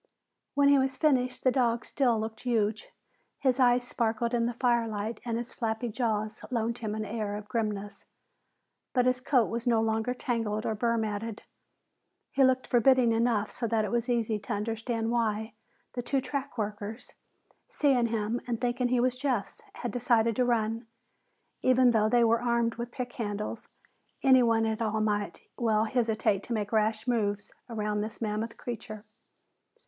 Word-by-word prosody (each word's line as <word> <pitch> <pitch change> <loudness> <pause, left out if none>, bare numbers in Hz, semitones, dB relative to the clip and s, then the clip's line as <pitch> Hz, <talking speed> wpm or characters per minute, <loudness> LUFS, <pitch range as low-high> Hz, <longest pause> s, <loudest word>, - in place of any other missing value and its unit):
When 285 0 +5
he 280 -1 +6
was 265 0 0
finished, 255 -5 +1
the 255 - +4
animal 240 -3 +2
still 245 -6 +1
looked 220 0 -5
huge. 220 -3 0 0.5
His 260 -1 +1
eyes 245 -1 +4
sparked 235 0 -1
in 235 -1 +2
the 240 - -3
firelight 230 -3 0
and 230 -2 -2
his 235 0 -6
flabby 225 +1 -2
jaws 215 -2 -2
loaned 235 -1 -1
him 215 -2 -3
an 215 0 -3
air 210 -1 -3
of 210 0 -7
grimness. 210 -3 -3 0.9
But 250 -2 +3
his 255 0 +2
coat 255 -3 +3
was 235 +3 -4
no 230 -2 +4
longer 225 +2 0
tangled 225 -4 -2
or - - 0
burr 230 +2 0
matted. 220 0 -3 0.9
He 275 - +3
looked 260 0 +3
forbidding 245 0 +4
enough 225 -2 +1
so 235 - -3
that 220 -1 +1
it 200 - -4
was 240 +1 0
easy 225 -3 +1
to 205 - -4
understand 225 +2 -2
why 220 -2 0 0.4
the 245 - -3
two 270 +3 0
track 270 +1 -4
workers, 210 +2 -5 0.5
seeing 275 - +2
him 225 +1 -1
and 235 -2 -2
thinking 245 0 0
he 250 0 +2
was 250 +1 +2
Jeff's, 250 -6 -2
had 245 - -4
decided 230 -1 +2
to 255 - +3
run. 225 -1 0 0.7
Even 255 -1 +5
though 215 -2 +3
they 240 +1 +4
were 230 0 +3
armed 235 -1 +1
with 235 +1 -5
pick 245 0 -5
handles, 210 0 -4 0.6
anyone 240 -4 +5
at 220 0 -1
all 220 -1 0
might 205 -1 -1 0.2
well 220 -3 +2
hesitate 220 -3 +1
to 235 - -5
make 210 -2 -2
rash 220 0 +1
moves 205 -4 -1 0.2
around 210 -2 -1
this 215 +1 -5
mammoth 220 +1 -3
creature. 215 -3 -6
230 Hz, 170 wpm, -29 LUFS, 215-245 Hz, 0.9 s, he